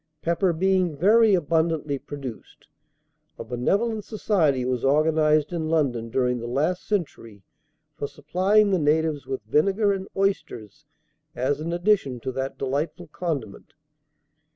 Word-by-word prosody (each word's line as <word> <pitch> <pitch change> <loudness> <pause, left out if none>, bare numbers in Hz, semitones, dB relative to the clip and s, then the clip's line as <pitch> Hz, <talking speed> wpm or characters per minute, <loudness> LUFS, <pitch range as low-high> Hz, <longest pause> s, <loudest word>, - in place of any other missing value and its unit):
Pepper 170 +2 +1
being 180 -2 +1
very 210 +5 +5
abundantly 160 -3 0
produced, 135 -6 -9 0.7
a - - -6
benevolent 205 - -1
society 165 - 0
was 125 -1 -1
organized 155 +2 +2
in 160 -2 -2
London 130 -8 0
during 125 +1 0
the 120 - -6
last 150 +9 -1
century 115 - -4 0.5
for 145 - -4
supplying 190 +9 +2
the 185 - +2
natives 155 -1 +1
with 130 -5 -4
vinegar 195 - +2
and 190 0 -5
oysters, 195 - -2 0.5
as 135 +3 0
an 160 +2 -4
addition 175 - +1
to 130 - -4
that 135 +1 -4
delightful 150 +5 -3
condiment. 145 - -5
155 Hz, 130 wpm, -24 LUFS, 135-185 Hz, 0.7 s, very